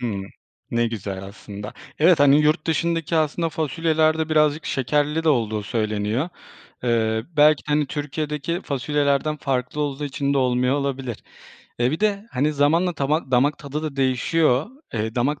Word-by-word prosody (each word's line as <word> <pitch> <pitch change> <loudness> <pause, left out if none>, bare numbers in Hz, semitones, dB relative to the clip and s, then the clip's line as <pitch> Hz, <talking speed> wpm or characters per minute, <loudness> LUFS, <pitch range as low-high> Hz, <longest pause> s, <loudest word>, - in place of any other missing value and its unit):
Hımm. 100 -5 -3 0.5
Ne 120 0 +1
güzel 100 -4 -5
aslında. 100 +1 -9 0.3
Evet, 165 0 +5
hani 145 +1 +6
yurt 155 0 +2
dışındaki 165 0 0
aslında 160 +2 +1
fasulyelerde 160 +1 +1
birazcık 155 0 +2
şekerli 150 +4 0
de - - +2
olduğu 110 -7 +1
söyleniyor. 110 +5 -1 0.6
Eee, 110 -1 +1
belki 150 0 +5
de, 150 - -1
hani, 150 -1 +2
Türkiye'deki 150 +3 -3
fasulyelerden 145 +1 0
farklı 135 0 -2
olduğu 145 0 -2
için 140 0 -1
de - - +2
olmuyor 125 0 +2
olabilir. 135 -4 -3 0.6
Eee, 120 - +3
bir 155 - -3
de, 210 0 0
hani, 145 +4 +1
zamanla 165 +5 +2
tama 145 0 -1
damak 135 +4 +2
tadı 145 +1 -5
da 155 -3 -4
değişiyor. 135 +2 +2 0.3
Eee, 110 0 -2
damak 140 +4 0
145 Hz, 150 wpm, -23 LUFS, 125-155 Hz, 0.6 s, hani